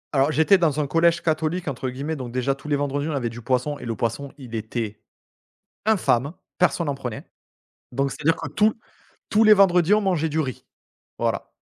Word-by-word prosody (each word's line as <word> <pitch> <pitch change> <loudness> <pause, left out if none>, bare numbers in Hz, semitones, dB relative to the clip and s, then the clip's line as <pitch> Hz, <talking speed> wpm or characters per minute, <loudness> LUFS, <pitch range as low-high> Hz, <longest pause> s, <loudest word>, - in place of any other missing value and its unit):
Alors, 135 +2 +3
j'étais 160 +6 +4
dans 155 -4 +1
un 150 - +1
collège 170 +4 +2
«catholique» 160 +2 -1
entre 130 -2 -3
guillemets. 140 +5 -4
Donc 130 -4 -6
déjà, 130 +2 0
tous 135 +2 -12
les 145 - +1
vendredis, 145 +1 -1
on - - -2
avait 120 -4 -1
du 120 +1 -9
poisson, 130 +4 -1
et - - -8
le 115 -1 -3
poisson 120 +6 -3
il 125 -5 -11
était 110 -1 -4 0.9
infâme! 160 - +2 0.3
Personne 170 -2 +2
en 140 - 0
prenait. 125 -5 -7 0.6
Donc, 135 +2 -1
c'est-à-dire 160 +2 +1
que - - -5
tous, 215 +1 +3 0.6
tous 215 +1 +4
les 215 -1 +8
vendredis, 185 -2 +4
on 215 - +4
mangeait 175 -5 0
du 155 +1 -1
riz, 130 -5 -3 0.5
voilà. - - -2
145 Hz, 195 wpm, -23 LUFS, 130-170 Hz, 0.9 s, les